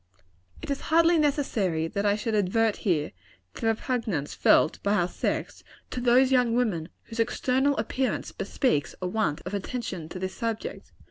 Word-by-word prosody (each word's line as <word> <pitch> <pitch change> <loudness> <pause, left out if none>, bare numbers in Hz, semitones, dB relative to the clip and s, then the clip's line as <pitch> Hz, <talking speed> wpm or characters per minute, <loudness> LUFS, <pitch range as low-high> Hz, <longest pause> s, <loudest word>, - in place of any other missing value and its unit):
It - - -4
is 280 - -2
hardly 335 +1 +5
necessary 220 - +1
that 200 +3 -1
I 205 - +3
should 220 +2 -3
advert, 215 +2 +2
here, 160 -6 0 0.4
to - - -10
the 225 - 0
repugnance 225 - -1
felt - - +3
by 200 +1 +1
our 175 -4 +2
sex, - - -3 0.3
to 250 - -3
those 250 +2 +4
young 250 -3 +3
women 195 -10 0
whose 230 0 -9
external 265 +4 +1
appearance 260 -1 -1
bespeaks 145 - -1
a 185 - -4
want 180 -5 -1
of 185 - -5
attention 200 -5 -4
to 185 - -7
this 185 0 -4
subject. 230 -2 -4
225 Hz, 170 wpm, -27 LUFS, 185-250 Hz, 0.4 s, hardly